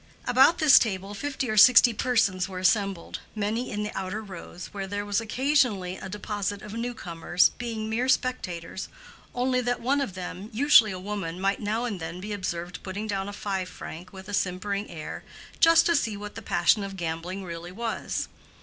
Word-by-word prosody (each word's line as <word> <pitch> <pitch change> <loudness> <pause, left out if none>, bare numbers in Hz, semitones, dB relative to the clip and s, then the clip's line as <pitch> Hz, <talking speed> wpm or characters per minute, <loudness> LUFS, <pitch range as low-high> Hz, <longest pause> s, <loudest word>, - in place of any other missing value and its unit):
About 265 +6 +5
this 310 -3 +8
table 195 -2 -2
fifty 270 +4 -3
or 215 -1 -1
sixty 245 +2 +8
persons 205 -6 +1
were 185 - -6
assembled, 195 -1 0 0.2
many 215 +4 -1
in 210 0 -3
the 210 - -5
outer 195 +3 -3
rows, 180 -3 -9
where 195 -1 -4
there 205 +1 -3
was 205 +1 0
occasionally 225 -6 +1
a 190 - -8
deposit 205 0 -3
of 210 -1 -8
new 240 +1 -3
comers, 175 -1 +2
being 225 -2 -3
mere 235 +4 0
spectators, 190 -9 -1 0.5
only 250 +1 +1
that 245 0 -1
one 275 +4 +1
of 200 -9 -3
them, 185 +2 -6
usually 230 -3 +6
a 185 - -5
woman, 185 -3 -4
might 195 +1 +1
now 220 +3 -1
and 205 -6 -3
then 170 +2 -6
be 210 +3 -5
observed 175 -3 -4
putting 200 +3 -5
down 200 -2 -2
a - - -7
five 195 -3 -3
franc 175 +1 -9
with 190 -1 -11
a 205 - -7
simpering 200 +2 -1
air, 160 -3 -7 0.4
just 330 0 +6
to 340 - +3
see 215 -8 0
what 205 0 -7
the 225 - -8
passion 200 +1 +2
of 195 -1 -6
gambling 170 +3 -4
really 170 0 -7
was. 225 +3 -3
205 Hz, 190 wpm, -27 LUFS, 185-230 Hz, 0.5 s, this